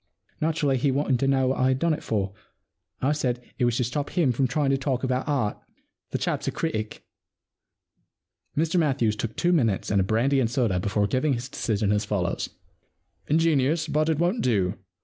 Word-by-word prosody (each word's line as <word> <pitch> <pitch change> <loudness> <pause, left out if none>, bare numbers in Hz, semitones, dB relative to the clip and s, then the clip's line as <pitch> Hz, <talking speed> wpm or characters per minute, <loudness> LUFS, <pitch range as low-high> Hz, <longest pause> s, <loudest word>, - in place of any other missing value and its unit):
Naturally 155 -4 +1
he 140 +3 +1
wanted 135 -2 +1
to 135 - +1
know 135 -1 +3
what 135 - -1
I 130 - +3
had 130 0 +2
done 165 +3 +1
it 150 - -4
for, 100 -3 -2 0.7
and 130 - +2
I - - +3
said 125 -5 0 0.2
it 125 - +3
was 120 -1 +1
to 125 - +1
stop 140 +5 -2
him 165 -8 +2
from 130 +2 +1
trying 140 +1 +1
to 135 - +2
talk 135 -2 -1
about 130 +1 -1
art 130 -8 0 0.3
— - - -54
the - - -2
cliap's - - -2
a - - +1
critic' 110 -10 -3 1.5
Mr 165 +3 +2
Matthews 135 -9 +1
took 110 +1 -4
two 175 +1 +2
minutes 115 - +1
and 100 -2 +3
a - - +2
brandy 120 +8 +2
and 120 -4 +1
soda 115 -7 +1
before 100 +2 0
giving 130 +7 +1
his 125 +2 -4
decision 105 -5 -1
as 105 0 +1
follows: 100 -4 -2 0.3
— - - -46
* - - -43
Ingenious, 155 0 +2
but 155 +1 +1
it 160 - +1
won't 175 +8 +1
do. 100 -7 +1
130 Hz, 210 wpm, -25 LUFS, 110-150 Hz, 1.5 s, know